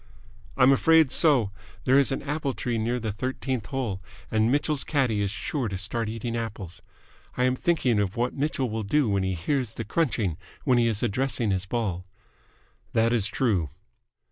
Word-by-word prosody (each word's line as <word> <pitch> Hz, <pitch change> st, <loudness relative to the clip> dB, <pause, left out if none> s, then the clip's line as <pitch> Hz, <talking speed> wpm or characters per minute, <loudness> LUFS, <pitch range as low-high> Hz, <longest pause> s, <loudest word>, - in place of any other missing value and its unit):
"I'm 130 Hz, 0 st, +6 dB
afraid 160 Hz, +1 st, +5 dB
so. 130 Hz, -, +4 dB, 0.3 s
There 130 Hz, +2 st, +5 dB
is 140 Hz, -, +3 dB
an 135 Hz, -, -2 dB
apple 145 Hz, -1 st, -2 dB
tree 120 Hz, -2 st, -2 dB
near 120 Hz, +3 st, -1 dB
the 110 Hz, -2 st, -3 dB
thirteenth 130 Hz, +1 st, -3 dB
hole, 120 Hz, -9 st, -3 dB, 0.3 s
and 110 Hz, +1 st, +2 dB
Mitchell's 145 Hz, 0 st, +1 dB
caddie 125 Hz, -8 st, +1 dB
is 100 Hz, -, 0 dB
sure 115 Hz, +5 st, -2 dB
to 95 Hz, -2 st, -4 dB
start 110 Hz, +3 st, -2 dB
eating 115 Hz, +1 st, -4 dB
apples. 105 Hz, -7 st, -5 dB, 0.6 s
I 125 Hz, -, +2 dB
am 125 Hz, 0 st, +2 dB
thinking 130 Hz, -8 st, +1 dB
of 100 Hz, -1 st, -1 dB
what 120 Hz, +1 st, 0 dB
Mitchell 140 Hz, -2 st, -1 dB
will 110 Hz, 0 st, -3 dB
do 130 Hz, +7 st, +1 dB
when 100 Hz, -2 st, +1 dB
he 95 Hz, 0 st, -1 dB
hears 115 Hz, -, -2 dB
the 115 Hz, -, -5 dB
crunching 105 Hz, -, 0 dB, 0.3 s
when 125 Hz, -4 st, +3 dB
he 115 Hz, -, +3 dB
is 110 Hz, -1 st, 0 dB
addressing 120 Hz, -1 st, 0 dB
his 95 Hz, 0 st, -1 dB
ball." 95 Hz, -5 st, -2 dB, 0.9 s
"That 115 Hz, +1 st, +3 dB
is 110 Hz, -4 st, +2 dB
true." 100 Hz, -, 0 dB
115 Hz, 180 wpm, -26 LUFS, 105-135 Hz, 0.9 s, I'm